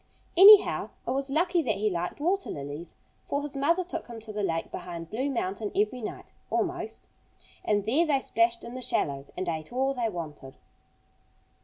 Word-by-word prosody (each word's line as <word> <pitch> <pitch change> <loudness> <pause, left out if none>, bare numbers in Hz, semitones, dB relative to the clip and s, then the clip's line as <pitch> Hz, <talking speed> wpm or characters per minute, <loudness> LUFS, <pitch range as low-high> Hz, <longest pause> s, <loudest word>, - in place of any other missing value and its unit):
Anyhow, 400 +3 +8 0.2
it - - 0
was 270 +1 -1
lucky 345 +4 +2
that 225 -9 0
he 210 +2 0
liked 175 +6 -3
water 375 +6 0
lilies. 145 +4 -6 0.3
For 285 0 -1
his 290 -1 -7
mother 335 +7 +2
took 340 -2 -6
him 235 -2 -8
to 215 -1 -9
the 210 - -2
lake 165 -4 -1
behind 170 -2 -7
Blue 260 +6 -1
Mountain 210 -4 -2
every 215 +5 +1
night, 215 - -7 0.2
almost. - - -2 0.6
And 205 -1 +1
there 295 +10 +2
they 280 -3 +3
splashed 230 -2 +1
in 235 - -8
the 255 - -6
shallows 140 - -1
and 185 0 -3
ate 160 +1 -3
all 265 +2 +1
they 240 -3 -1
wanted. 150 -7 -7
230 Hz, 180 wpm, -28 LUFS, 180-285 Hz, 0.6 s, Anyhow